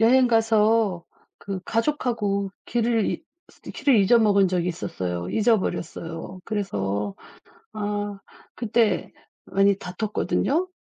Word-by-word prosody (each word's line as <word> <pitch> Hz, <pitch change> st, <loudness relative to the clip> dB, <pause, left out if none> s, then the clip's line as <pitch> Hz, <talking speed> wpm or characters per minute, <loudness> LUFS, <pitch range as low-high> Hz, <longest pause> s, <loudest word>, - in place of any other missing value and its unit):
여행 250 Hz, +3 st, +5 dB
가서 220 Hz, -5 st, +3 dB, 0.3 s
그 195 Hz, -2 st, -5 dB
가족하고 225 Hz, -6 st, 0 dB, 0.2 s
길을 230 Hz, -2 st, +1 dB
잊 -, -, -3 dB, 0.5 s
길을 280 Hz, -4 st, +3 dB
잊어먹은 205 Hz, -1 st, +5 dB
적이 180 Hz, -1 st, 0 dB
있었어요. 90 Hz, -, -4 dB
잊어버렸어요. 185 Hz, -5 st, -1 dB
그래서 105 Hz, -, -2 dB, 0.6 s
아 205 Hz, -1 st, -3 dB, 0.4 s
그때 230 Hz, -1 st, +1 dB, 0.3 s
많이 195 Hz, 0 st, +3 dB
다퉜거든요. 215 Hz, -, -1 dB
205 Hz, 240 characters per minute, -24 LUFS, 185-230 Hz, 0.6 s, 여행